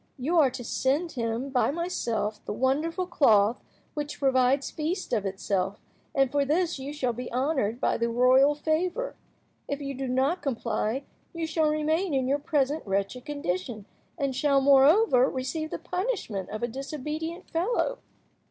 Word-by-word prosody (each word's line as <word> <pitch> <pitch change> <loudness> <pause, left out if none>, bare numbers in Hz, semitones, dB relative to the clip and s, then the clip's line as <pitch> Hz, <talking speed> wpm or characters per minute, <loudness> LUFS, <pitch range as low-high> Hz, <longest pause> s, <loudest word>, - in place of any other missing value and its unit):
You 315 +7 +1
are 280 -4 +5
to 245 - -7
send 285 +8 0
him 235 +2 -3
by 255 - +2
myself 235 -10 -2
the - - -3
wonderful 300 - 0
cloth 230 - +3 0.3
which 295 -1 -4
provides 265 0 +2
feasts 325 0 -3
of 205 -4 +1
itself, 195 0 -2 0.4
and 270 -2 +3
for 285 -1 +2
this 325 +2 0
you 270 +2 -5
shall 260 -5 -1
be 245 +2 -6
honoured 255 -4 0
by - - +1
the 235 0 0
royal 255 +4 +5
favour. 355 +11 -1 0.5
If 285 - -3
you 275 -1 -4
do 270 0 -4
not 265 +8 +1
comply, 235 -2 -1 0.3
you 335 -1 -2
shall 315 -1 +1
remain 310 +2 0
in 260 -1 +1
your 280 +2 +1
present 290 0 0
wretched 200 +6 -2
condition, 215 - -3 0.3
and 275 -4 -1
shall, 280 0 +3
moreover, 275 - +5
receive 310 +5 -3
the - - -4
punishment 360 - -3
of 215 +2 -5
a - - +2
disobedient 305 +7 -5
fellow. 365 +8 0
275 Hz, 160 wpm, -27 LUFS, 245-315 Hz, 0.5 s, are